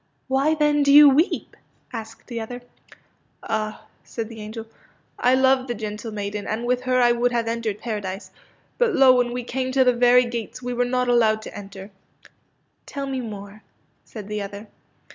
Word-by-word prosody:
'' - - -46
Why, 295 +4 +2
then, 295 -1 +2
do 280 0 +3
you 295 +1 +10
weep? 290 +6 +1 0.2
" - - -33
asked 225 +1 -15
the 235 -2 -5
other. 245 +2 -7 0.4
'* - - -38
Ah," 215 -1 -3 0.2
said 230 -2 -6
the 225 -2 -9
angel, 220 +2 -7
'^ - - -28 0.5
I 250 +1 +4
love 260 0 +3
the 240 - -3
gentle 215 +1 -6
maiden, 205 0 -4
and 225 +2 -3
with 250 +1 0
her 255 0 +2
I 240 -1 +5
would 240 +1 +1
have 235 -1 -1
entered 230 -3 -2
Paradise. 205 -3 -5 0.5
But, 485 -2 +2
lo, 260 -1 +7
when 245 -1 +1
we 245 0 -4
came 260 +1 -3
to 265 0 +5
the 250 -1 +4
very 245 +1 +5
gates 235 -1 -5
we 250 0 -4
were 245 0 +1
not 250 0 0
allowed 220 -3 +3
to - - -8
enter/' 200 0 -10 0.3
^* - - -18 0.6
Tell 280 -1 -5
me 265 -1 -3
more," 205 -2 -9 0.4
said 210 -3 -10
the 210 0 -3
other. 200 +1 -7
240 Hz, 200 wpm, -23 LUFS, 215-255 Hz, 0.6 s, you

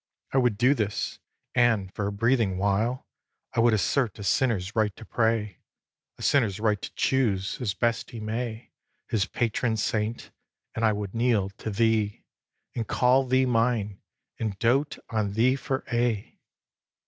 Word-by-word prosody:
I 135 - +4
would 120 -5 +2
do 125 +5 +4
this; 105 -6 -2 0.3
and, 115 -6 +2
for 100 - -2
a - - -2
breathing 110 -2 +1
while, 100 +6 0 0.5
I - - -1
would 115 -1 +5
assert 110 +2 0
a 105 - -7
sinner's 105 -3 +1
right 110 -3 +1
to 110 - -11
pray, 110 -5 0 0.6
A - - -9
sinner's 110 -8 +2
right 105 -2 +1
to - - -6
choose, 110 -6 0
as 105 -5 -1
best 115 -1 0
he 115 - -8
may, 110 +1 -4 0.4
His 105 -4 +1
patron 115 -1 0
saint; 110 +1 -2 0.4
and 115 - -3
I 110 - +5
would 105 -2 -4
kneel 115 -5 +1
to 105 - -7
thee, 110 -1 +1 0.5
And 115 -3 -2
call 130 +1 +3
thee 130 +1 +3
mine, 115 -4 0 0.4
and 110 -4 -2
dote 130 +7 +1
on 105 -3 -1
thee 120 +5 +3
for 135 -1 -3
aye! 120 -3 -1
110 Hz, 160 wpm, -26 LUFS, 105-120 Hz, 0.6 s, would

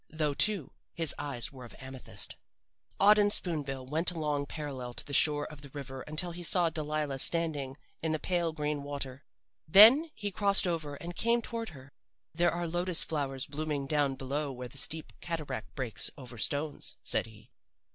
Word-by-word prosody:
Though, 155 -2 -1
too, 195 -2 +2 0.2
his 165 -2 +2
eyes 140 -5 -3
were 130 -3 -11
of 120 - -11
amethyst. 130 -5 -6 0.6
"Auden 205 +1 +6
Spoon 170 -6 -1
bill 135 -2 -5
went 155 +6 +1
along 150 -4 -2
parallel 135 -6 -6
to - - -4
the 140 - -7
shore 145 +1 +5
of 150 -2 -10
the 140 - -11
river 135 -1 -7
until 155 +4 -1
he 175 +1 -8
saw 175 -1 +4
Delilah 150 -3 -2
standing 145 -4 +2 0.2
in 160 - -1
the 155 - +1
pale 170 0 0
green 150 -2 -2
water. 140 -1 -5 0.4
Then 230 - +9
he 205 -1 -4
crossed 200 -1 +4
over 160 -5 -2
and 175 +4 -8
came 235 +1 +2
toward 230 -1 -5
her. 140 -2 -13 0.4
"'There 170 +1 +3
are 175 +1 -3
lotus 175 +1 +1
flowers 135 -4 -3
blooming 150 -1 -3
down 145 -1 +1
below 140 +2 -3
where 125 -1 -7
the 140 - -6
steep 160 +2 -1
cataract 150 -9 -5
breaks 125 -5 0
over 125 -3 -10
stones,' 145 +4 -2
said - - +2
he. 110 +2 -16
150 Hz, 175 wpm, -30 LUFS, 135-170 Hz, 0.6 s, Then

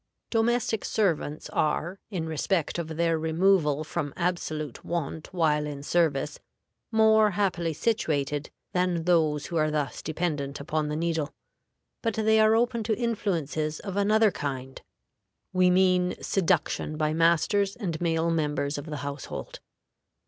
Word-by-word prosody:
DOMESTIC 225 -1 +1
SERVANTS 165 -7 0
are, 170 +4 0
in 180 -6 -3
respect 160 +2 -1
of 170 - -3
their 165 0 0
removal 160 -2 +2
from 145 -2 -4
absolute 155 -5 -2
want 160 -2 -4
while 150 -4 +1
in 140 -1 -6
service, 150 -3 +1 0.5
more 220 -1 +5
happily 175 -5 +1
situated 150 -6 -1 0.2
than 180 -2 +1
those 160 -4 +2
who 170 - -3
are 155 -1 +2
thus 150 -3 -2
dependent 150 -4 -2
upon 150 +1 -1
the 150 - -2
needle. 160 -2 -1 0.7
But 225 -3 -1
they 220 0 +3
are 220 0 +5
open 235 0 +1
to 220 -1 0
influences 165 - -1
of 195 -2 -5
another 210 +1 +4
kind 135 -4 -5 0.7
we 185 0 +4
mean 180 0 +3
seduction 170 -4 0
by 155 0 +1
masters 170 +5 +2
and 175 -8 -4
male 165 -1 +1
members 150 -2 -1
of 145 - -9
the 150 -1 -4
household. 140 -1 -6
165 Hz, 135 wpm, -27 LUFS, 150-195 Hz, 0.7 s, more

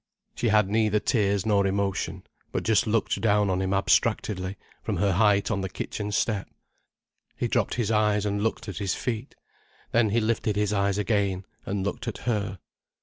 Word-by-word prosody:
She 120 - -1
had 105 -2 +4
neither 105 0 +2
tears 100 -2 +1
nor 100 -2 +3
emotion, 100 -1 -1 0.3
but - - -2
just 110 -1 +3
looked 110 0 0
down 105 -2 +3
on 90 0 0
him 95 0 -1
abstractedly, 95 0 +1 0.2
from - - -2
her 100 -1 +2
height 100 +2 +3
on 100 -2 0
the 95 - -3
kitchen 105 +2 -4
step. 105 0 0 0.9
He - - 0
dropped - - 0
his 115 -3 0
eyes 105 -1 +2
and 100 0 -1
looked 110 +1 -1
at 100 -5 -5
his 100 -3 -1
feet. 120 +2 -4 0.6
Then 115 -2 +3
he 115 +3 +2
lifted 110 -1 0
his 105 0 +1
eyes 100 -1 +1
again, 100 -3 0 0.2
and 95 -1 -1
looked 100 - -4
at - - -3
her. 105 -5 -1
105 Hz, 180 wpm, -26 LUFS, 100-110 Hz, 0.9 s, had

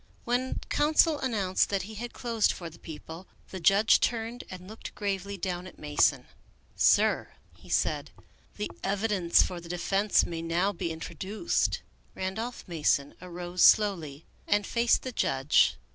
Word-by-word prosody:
When 245 +2 -1
counsel 305 +1 +3
announced 205 -8 0
that 200 -1 -1
he 215 +3 -9
had 235 +3 -6
closed 230 -3 +1
for 170 -2 -7
the 165 - -16
People, 160 +2 -10 0.2
the 190 - -5
judge 195 +5 +5
turned 235 +1 -2
and 185 0 -9
looked 220 +2 -9
gravely 200 -1 -3
down 180 0 -4
at - - -13
Mason. 150 -1 +1 0.3
" - - -35
Sir," - - +3 0.2
he - - -18
said, - - 0 0.2
" - - -31
the 105 - -3
evidence 195 -3 +2
for 175 -1 -5
the 170 - -12
defense 195 +4 +2
may 165 -1 -5
now 170 +4 0
be 170 - -3
introduced." 180 - -2 0.3
Randolph 220 +6 -4
Mason 150 -4 0
arose 180 0 -5
slowly 165 -9 +4 0.2
and 205 0 +2
faced 235 0 +2
the 255 - -4
judge. 135 - +2
190 Hz, 155 wpm, -28 LUFS, 170-220 Hz, 0.3 s, judge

